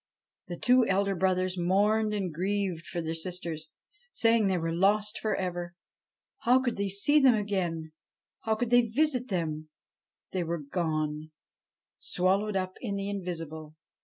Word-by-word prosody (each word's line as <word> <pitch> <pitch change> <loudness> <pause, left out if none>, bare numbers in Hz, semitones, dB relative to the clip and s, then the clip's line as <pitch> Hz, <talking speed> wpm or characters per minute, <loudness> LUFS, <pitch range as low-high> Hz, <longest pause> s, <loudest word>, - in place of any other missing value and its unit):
The 175 -1 -5
two 250 +5 +4
elder 195 +1 +1
brothers 185 0 0
mourned 210 +5 +2
and 195 -5 -2
grieved 185 -1 -2
for 175 - -3
their 160 0 -2
sisters, 165 -2 -5 0.4
saying 225 -2 +3
they 190 -1 +1
were 165 -1 -2
lost 205 +4 +2
for 215 - -1
ever. 175 -2 -4 0.6
How 250 +2 +4
could 245 -3 -1
they 200 0 -1
see 200 +11 +4
them 265 -4 +6
again? 180 -6 -2 0.5
How 220 -1 0
could 240 +1 -2
they 245 0 +7
visit 250 +2 +1
them? 155 -6 -3 0.6
They 185 -2 -1
were 170 +1 -2
gone 155 -1 -2 0.7
swallowed 195 +3 0
up 185 -1 -2
in 205 -5 -3
the 200 0 -3
invisible. 165 -5 -6
190 Hz, 150 wpm, -29 LUFS, 170-210 Hz, 0.7 s, they